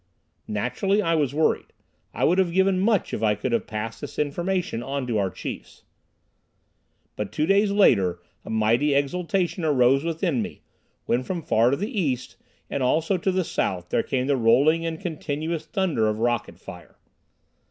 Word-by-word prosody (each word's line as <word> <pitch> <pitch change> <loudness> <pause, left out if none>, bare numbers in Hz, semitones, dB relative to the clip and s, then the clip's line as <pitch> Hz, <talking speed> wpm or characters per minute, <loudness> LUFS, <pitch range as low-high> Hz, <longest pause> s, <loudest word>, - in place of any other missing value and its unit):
Naturally 125 - 0
I 165 -5 +1
was 150 -5 +1
worried. 155 +2 0 0.4
I - - -3
would 180 +3 +3
have 185 -3 +2
given 190 +1 +2
much 205 0 +1
if - - -2
I 105 -1 +2
could 115 +5 -3
have 115 -4 0
passed 110 +1 -5
this 145 - -8
information 170 -1 -1
on 135 +1 -3
to 115 -4 0
our 95 -1 0
chiefs. - - -8 1.3
But 105 -2 -4
two 150 +8 0
days 200 +3 +3
later 100 - +3 0.2
a - - -10
mighty 115 +7 +2
exultation 175 +4 0
arose 135 -2 +3
within 165 - -1
me, - - -7 0.4
when 120 - +1
from 170 +4 -4
far 115 -1 +3
to 140 - +1
the 210 +3 -3
east 130 -6 -2 0.3
and 140 - -3
also 160 +9 +2
to 190 - 0
the 185 0 0
south 90 - -2
there - - +2
came 130 -2 -1
the 140 0 +1
rolling 145 +8 +3
and 160 -1 -4
continuous 160 -2 -4
thunder 185 - 0
of 105 0 -1
rocket 120 -6 -1
fire. 90 -2 -12
145 Hz, 175 wpm, -24 LUFS, 115-175 Hz, 1.3 s, would